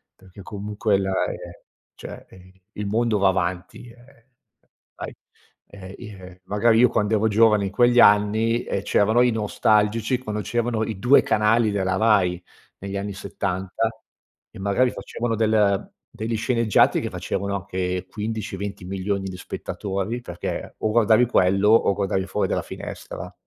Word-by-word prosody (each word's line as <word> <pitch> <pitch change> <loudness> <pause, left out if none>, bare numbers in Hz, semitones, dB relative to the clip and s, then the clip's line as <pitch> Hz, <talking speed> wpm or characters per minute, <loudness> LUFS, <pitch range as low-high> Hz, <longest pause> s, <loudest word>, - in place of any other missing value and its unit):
Perché 95 +1 -15
comunque 105 +1 -1
la 95 0 -2
ehm, - - -4 0.6
cioè, - - -10
ehm, 95 0 -17 0.2
il 105 -1 -5
mondo 110 0 +1
va 100 - +3
avanti, 95 +4 -2
ehm, 120 0 -20 0.7
sai - - -7 0.5
ehm, 95 -1 -11
i - - -9
ehm, 95 -2 -13
magari 110 +2 +2
io, 125 - +7
quando 105 +1 +1
ero 110 +1 +2
giovane, 105 -1 +4
in 95 - -4
quegli 120 +3 +4
anni, 110 +3 +4
ehm, 100 - -3
c'erano 110 +3 +2
i 125 -1 +4
nostalgici, 110 +2 +1
quando 105 -4 -4
c'erano 115 +2 -1
i 110 -2 -5
2 120 +7 +5
canali 110 +1 +2
della 95 -2 0
Rai 95 -5 +2 0.4
negli 100 +1 -6
anni 100 +1 -3
70, 95 +2 -3 0.6
e - - -13
magari 100 +6 +1
facevano 115 -1 -4
del 105 -3 +1 0.2
degli 115 +1 -3
sceneggiati 115 -2 +2
che - - -3
facevano 100 0 -3
anche 90 -1 -3
15-20.000.000 100 -2 -4
di 90 - -8
spettatori. 100 +4 -4
Perché, 90 -7 -6
o 110 - 0
guardavi 115 +1 +4
quello, 95 -3 +2
o 110 -3 +4
guardavi 95 -1 -1
fuori - - -1
dalla - - 0
finestra. - - -8
105 Hz, 150 wpm, -23 LUFS, 95-115 Hz, 0.7 s, io